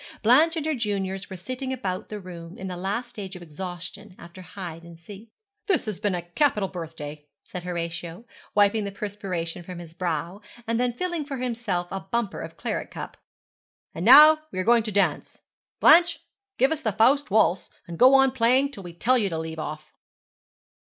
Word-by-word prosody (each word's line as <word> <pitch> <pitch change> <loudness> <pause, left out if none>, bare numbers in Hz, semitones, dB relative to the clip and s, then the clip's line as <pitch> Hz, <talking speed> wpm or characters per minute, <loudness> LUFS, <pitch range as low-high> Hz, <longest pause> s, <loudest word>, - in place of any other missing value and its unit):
Blanche 300 +9 +5
and 315 -2 -3
her 315 - +1
juniors 200 -5 -3
were 190 - -7
sitting 255 +8 -5
about 190 -8 -4
the 210 - -5
room, 175 -2 -10
in 190 - -6
the 180 - -5
last 200 +7 -3
stage 195 -4 -8
of 180 - -9
exhaustion 180 +4 -8
after 170 +2 -12
hide 175 -2 -8
and 170 -1 -13
seek. 200 +6 -12 0.4
'This 380 -9 +2
has 215 -4 -4
been 205 -3 0
a 175 - -4
capital 205 - +1
birthday,' 155 -4 -8 0.2
said 180 - -7
Horatio, 170 +2 -5 0.3
wiping 205 +1 +4
the 200 - -4
perspiration 190 -4 -5
from 180 +1 -9
his 170 -2 -10
brow, 170 +2 -3 0.2
and 230 +1 -1
then 250 0 +1
filling 345 +5 -3
for 280 -1 -6
himself 230 -8 -2
a 195 - -3
bumper 200 +2 -3
of - - -8
claret - - -3
cup; - - -8 0.8
'and 165 - -5
now 300 +7 +9
we - - -7
are 185 - 0
going 235 +3 +5
to 215 -1 -5
dance. 200 0 0 0.4
Blanche, 340 +2 +6 0.4
give 265 +3 +3
us 315 -1 -1
the 220 - -1
Faust 255 +7 +3
Waltz, 200 -3 +2 0.2
and 170 -1 -8
go 260 +2 +8
on 270 -1 +5
playing 260 +3 +2
till 205 - -10
we 175 -2 -9
tell 250 +9 +2
you 205 -3 0
to 165 - -3
leave 160 0 -5
off.' 155 0 -6
195 Hz, 195 wpm, -25 LUFS, 175-240 Hz, 0.8 s, now